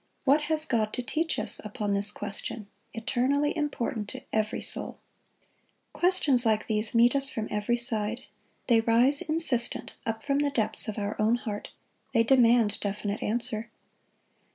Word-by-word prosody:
What 290 Hz, +2 st, +2 dB
has 310 Hz, -1 st, +3 dB
God 220 Hz, -6 st, -1 dB
to 250 Hz, -, -4 dB
teach 325 Hz, +5 st, -2 dB
us -, -, 0 dB
upon 210 Hz, -1 st, -4 dB
this 200 Hz, +1 st, +6 dB
question, 205 Hz, +1 st, -5 dB, 0.3 s
eternally 265 Hz, +6 st, -1 dB
important 250 Hz, -8 st, -3 dB
to -, -, -9 dB
every 215 Hz, +1 st, -1 dB
soul? -, -, -2 dB, 1.0 s
Questions 305 Hz, -9 st, +5 dB
like 220 Hz, -2 st, +1 dB
these 215 Hz, +1 st, -1 dB
meet 235 Hz, +3 st, +4 dB
us 275 Hz, 0 st, 0 dB
from 220 Hz, -4 st, -5 dB
every 210 Hz, +3 st, -1 dB
side. 230 Hz, -1 st, +1 dB, 0.4 s
They 230 Hz, -2 st, +3 dB
rise 240 Hz, +5 st, +3 dB
insistent 310 Hz, -7 st, +2 dB
up 225 Hz, 0 st, -4 dB
from 280 Hz, -1 st, 0 dB
the 290 Hz, 0 st, +1 dB
depths 220 Hz, -4 st, 0 dB
of 215 Hz, -, -5 dB
our 205 Hz, 0 st, -3 dB
own 220 Hz, +2 st, +2 dB
heart. 210 Hz, -4 st, -6 dB, 0.5 s
They 230 Hz, -, +4 dB
demand 235 Hz, -3 st, +3 dB
definite 205 Hz, +1 st, -4 dB
answer. 230 Hz, 0 st, -3 dB
235 Hz, 155 wpm, -27 LUFS, 215-270 Hz, 1.0 s, this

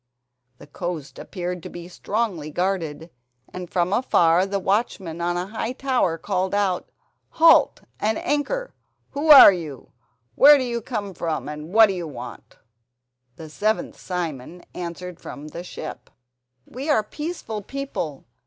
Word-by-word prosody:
The -, -, -13 dB
coast 160 Hz, -1 st, -6 dB
appeared 180 Hz, -1 st, -5 dB
to -, -, -8 dB
be 175 Hz, 0 st, -9 dB
strongly 185 Hz, -4 st, -3 dB
guarded, 165 Hz, -2 st, -2 dB, 0.4 s
and 180 Hz, -1 st, -7 dB
from 180 Hz, +1 st, 0 dB
afar 180 Hz, -7 st, +3 dB
the 200 Hz, 0 st, -1 dB
watchman 190 Hz, -4 st, -1 dB
on 175 Hz, +1 st, 0 dB
a 180 Hz, -, -2 dB
high 225 Hz, +4 st, -4 dB
tower 255 Hz, -11 st, 0 dB
called 185 Hz, +4 st, -1 dB
out: 195 Hz, -3 st, 0 dB, 0.4 s
"Halt 330 Hz, 0 st, +5 dB, 0.2 s
and 215 Hz, +1 st, 0 dB
anchor! -, -, -2 dB, 0.4 s
Who 290 Hz, +3 st, -3 dB
are 280 Hz, -8 st, +11 dB
you? 155 Hz, -7 st, -8 dB, 0.4 s
Where 290 Hz, -, +8 dB
do 265 Hz, -, -1 dB
you 235 Hz, -2 st, -3 dB
come 210 Hz, -4 st, -4 dB
from, 160 Hz, -6 st, -3 dB
and 150 Hz, +2 st, -7 dB
what 225 Hz, +2 st, +8 dB
do 200 Hz, -, -1 dB
you 175 Hz, -3 st, -5 dB
want?" 145 Hz, -, -10 dB, 0.8 s
The 160 Hz, +3 st, -10 dB
seventh 210 Hz, +8 st, -2 dB
Simon 175 Hz, -2 st, -5 dB
answered 180 Hz, 0 st, -7 dB
from 150 Hz, +2 st, -9 dB
the 170 Hz, +3 st, -7 dB
ship: 160 Hz, -3 st, -8 dB, 0.6 s
"We 270 Hz, +5 st, -6 dB
are 220 Hz, -8 st, +3 dB
peaceful 295 Hz, -4 st, -5 dB
people. 205 Hz, -, -5 dB
180 Hz, 145 wpm, -23 LUFS, 165-225 Hz, 0.8 s, are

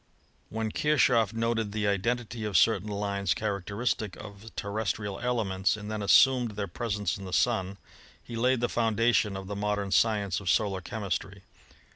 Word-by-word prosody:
When 110 Hz, 0 st, -3 dB
Kirchoff 125 Hz, -8 st, +3 dB
noted 115 Hz, -2 st, -1 dB
the 105 Hz, -1 st, 0 dB
identity 115 Hz, +3 st, -1 dB
of 105 Hz, -4 st, +1 dB
certain 105 Hz, +1 st, +3 dB
lines 100 Hz, -1 st, -1 dB
char 100 Hz, -2 st, -2 dB
acteristic 105 Hz, 0 st, -2 dB
of 105 Hz, +1 st, -10 dB
terrestrial 100 Hz, -1 st, -3 dB
elements, 105 Hz, -5 st, 0 dB
and 105 Hz, 0 st, -7 dB
then 110 Hz, -1 st, -3 dB
assumed 125 Hz, +3 st, +5 dB
their 100 Hz, -1 st, -3 dB
presence 105 Hz, +1 st, -2 dB
in 95 Hz, -, -8 dB
the 95 Hz, -, -7 dB
Sun, 100 Hz, -4 st, +1 dB, 0.5 s
he 120 Hz, -, -8 dB
laid 125 Hz, +1 st, +2 dB
the 120 Hz, -, +2 dB
foundation 115 Hz, -3 st, +1 dB
of 95 Hz, -, -7 dB
the 100 Hz, +1 st, -5 dB
modern 100 Hz, -1 st, -1 dB
science 105 Hz, -5 st, +2 dB
of 95 Hz, -3 st, -4 dB
solar 100 Hz, -2 st, +1 dB
chemistry. 100 Hz, 0 st, -4 dB
105 Hz, 160 wpm, -28 LUFS, 100-115 Hz, 0.5 s, assumed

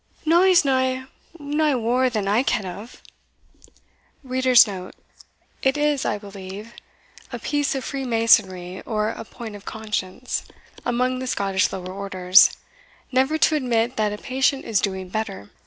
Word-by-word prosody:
"Na, 335 Hz, +3 st, +5 dB
he's 370 Hz, -4 st, +5 dB
no 260 Hz, -1 st, +1 dB, 0.3 s
nae 295 Hz, 0 st, +1 dB
waur 250 Hz, +2 st, +1 dB
that 215 Hz, -4 st, -2 dB
I 210 Hz, +4 st, +3 dB
ken 215 Hz, -6 st, 0 dB
of." 200 Hz, +6 st, -9 dB, 1.2 s
It 255 Hz, +1 st, 0 dB
is, 295 Hz, -2 st, +1 dB
I 210 Hz, -, 0 dB
believe, 200 Hz, +2 st, -9 dB, 0.6 s
a -, -, -4 dB
piece 290 Hz, -1 st, -1 dB
of 265 Hz, -, -3 dB
free 275 Hz, -1 st, -4 dB
masonry, 190 Hz, -6 st, +2 dB
or 215 Hz, -2 st, -1 dB
a 225 Hz, -, -6 dB
point 225 Hz, -1 st, -9 dB
of 205 Hz, -, -12 dB
conscience, 215 Hz, +1 st, -4 dB, 0.4 s
among 250 Hz, +1 st, 0 dB
the 260 Hz, -, -5 dB
Scottish 195 Hz, -5 st, 0 dB
lower 185 Hz, -1 st, -6 dB
orders, 190 Hz, -1 st, +4 dB, 0.5 s
never 265 Hz, +4 st, +2 dB
to 315 Hz, -1 st, +3 dB
admit 245 Hz, -3 st, 0 dB
that 215 Hz, -1 st, +1 dB
a 210 Hz, -, -4 dB
patient 265 Hz, +3 st, 0 dB
is 215 Hz, -4 st, +1 dB
doing 190 Hz, -2 st, -3 dB
better. 180 Hz, -, -5 dB
230 Hz, 140 wpm, -23 LUFS, 200-260 Hz, 1.2 s, Na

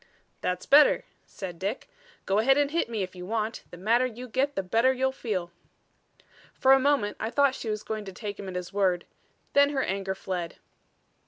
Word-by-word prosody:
"That's 180 Hz, 0 st, -2 dB
better," 295 Hz, -, +6 dB, 0.2 s
said 180 Hz, -4 st, -7 dB
Dick. 200 Hz, +7 st, -3 dB, 0.4 s
"Go 195 Hz, +2 st, +2 dB
ahead 270 Hz, +5 st, +4 dB
and 290 Hz, 0 st, +2 dB
hit 335 Hz, -6 st, 0 dB
me 220 Hz, -4 st, -2 dB
if 185 Hz, 0 st, -7 dB
you 180 Hz, -, -8 dB
want. 220 Hz, +3 st, -2 dB
The 175 Hz, -, -11 dB
madder 230 Hz, +7 st, +2 dB
you 250 Hz, +1 st, -8 dB
get 270 Hz, +4 st, 0 dB
the 195 Hz, -, -1 dB
better 230 Hz, +8 st, +3 dB
you'll 265 Hz, 0 st, 0 dB
feel." 195 Hz, -9 st, -3 dB, 1.0 s
For 265 Hz, -, +4 dB
a 270 Hz, -, +6 dB
moment 265 Hz, -7 st, +1 dB
I 220 Hz, -, -2 dB
thought 280 Hz, +1 st, +3 dB
she 235 Hz, -, -5 dB
was 215 Hz, 0 st, -3 dB
going 215 Hz, -1 st, -4 dB
to 195 Hz, -, -7 dB
take 205 Hz, +1 st, -6 dB
him 195 Hz, -, -6 dB
at 185 Hz, -, -7 dB
his 180 Hz, +1 st, -5 dB
word; 185 Hz, -3 st, +1 dB, 0.5 s
then 285 Hz, 0 st, +6 dB
her 275 Hz, -2 st, 0 dB
anger 195 Hz, 0 st, -2 dB
fled. 180 Hz, -3 st, -4 dB
215 Hz, 200 wpm, -27 LUFS, 190-260 Hz, 1.0 s, better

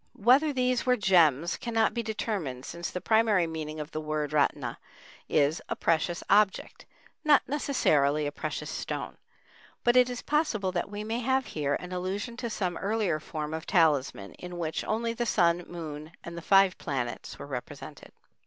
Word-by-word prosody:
Whether 260 Hz, +8 st, +4 dB
these 255 Hz, -2 st, +1 dB
were 250 Hz, -1 st, +3 dB
gems 170 Hz, -, +3 dB
cannot 230 Hz, -3 st, +1 dB
be 235 Hz, -, -1 dB
determined, 205 Hz, -, -3 dB
since 170 Hz, 0 st, -5 dB
the 180 Hz, -, -4 dB
primary 220 Hz, -4 st, +3 dB
meaning 155 Hz, -1 st, -5 dB
of 150 Hz, +1 st, -6 dB
the 155 Hz, -, -4 dB
word 150 Hz, -1 st, -2 dB
ratna 145 Hz, -2 st, 0 dB, 0.5 s
is 150 Hz, +2 st, +2 dB
"a -, -, -1 dB
precious 170 Hz, +1 st, 0 dB
object," 200 Hz, -1 st, +2 dB, 0.4 s
not 300 Hz, -2 st, +4 dB
necessarily 150 Hz, -, +2 dB
a 145 Hz, -, -2 dB
precious -, -, -4 dB
stone; -, -, -4 dB, 0.7 s
but 240 Hz, 0 st, +4 dB
it 250 Hz, 0 st, +6 dB
is 245 Hz, -1 st, -5 dB
possible 245 Hz, -, 0 dB
that 180 Hz, +1 st, -2 dB
we 205 Hz, +1 st, -5 dB
may 225 Hz, +2 st, -2 dB
have 260 Hz, +2 st, +1 dB
here 145 Hz, -2 st, -1 dB
an 180 Hz, -, -7 dB
allusion 190 Hz, +6 st, -3 dB
to 240 Hz, -1 st, -3 dB
some 185 Hz, -5 st, -2 dB
earlier 200 Hz, -6 st, 0 dB
form 150 Hz, 0 st, -5 dB
of 160 Hz, +1 st, -5 dB
talisman, 145 Hz, -, +2 dB
in 180 Hz, -1 st, -7 dB
which 160 Hz, -2 st, -2 dB
only 230 Hz, +1 st, -1 dB
the 235 Hz, 0 st, -2 dB
Sun, 175 Hz, -4 st, +2 dB
Moon, 155 Hz, -2 st, -7 dB
and 170 Hz, -, -7 dB
the 170 Hz, -, -6 dB
five 195 Hz, +1 st, +4 dB
planets 130 Hz, -5 st, -4 dB
were -, -, -8 dB
represented. 140 Hz, +2 st, -8 dB
180 Hz, 170 wpm, -28 LUFS, 155-225 Hz, 0.7 s, it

